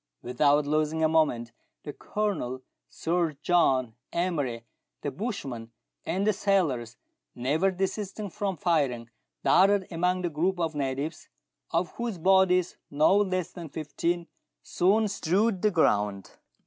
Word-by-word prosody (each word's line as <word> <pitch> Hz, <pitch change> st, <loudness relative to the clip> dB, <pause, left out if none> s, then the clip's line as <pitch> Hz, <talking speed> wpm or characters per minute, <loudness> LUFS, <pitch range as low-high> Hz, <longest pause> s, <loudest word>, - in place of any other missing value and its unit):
Without 145 Hz, +4 st, +2 dB
losing 155 Hz, +2 st, 0 dB
a -, -, +5 dB
moment, 150 Hz, -8 st, +1 dB, 0.3 s
the 145 Hz, -, -6 dB
Colonel, 160 Hz, -12 st, -3 dB, 0.3 s
Sir 170 Hz, -1 st, -1 dB
John, 130 Hz, -9 st, +2 dB, 0.2 s
Emery, 145 Hz, -10 st, -2 dB, 0.4 s
the 145 Hz, -, -2 dB
bushman, 135 Hz, -, -5 dB, 0.4 s
and 190 Hz, +3 st, 0 dB
the 215 Hz, -, +3 dB
sailors, 145 Hz, -, 0 dB, 0.4 s
never 150 Hz, +10 st, +1 dB
desisting 195 Hz, +2 st, -3 dB
from 195 Hz, 0 st, -3 dB
firing, 135 Hz, -9 st, 0 dB, 0.3 s
darted 195 Hz, +1 st, +4 dB
among 180 Hz, +2 st, 0 dB
the 175 Hz, -, 0 dB
group 175 Hz, +5 st, 0 dB
of 165 Hz, -2 st, -1 dB
natives, 140 Hz, +2 st, -3 dB, 0.4 s
of 170 Hz, 0 st, 0 dB
whose 235 Hz, -5 st, -3 dB
bodies 185 Hz, 0 st, +3 dB
no 155 Hz, +6 st, +4 dB
less 185 Hz, -4 st, 0 dB
than 170 Hz, -4 st, -8 dB
fifteen 165 Hz, +4 st, -2 dB, 0.4 s
soon 210 Hz, +5 st, +2 dB
strewed 195 Hz, +1 st, 0 dB
the 215 Hz, -, +4 dB
ground. 105 Hz, -, +1 dB
165 Hz, 125 wpm, -27 LUFS, 140-190 Hz, 0.4 s, a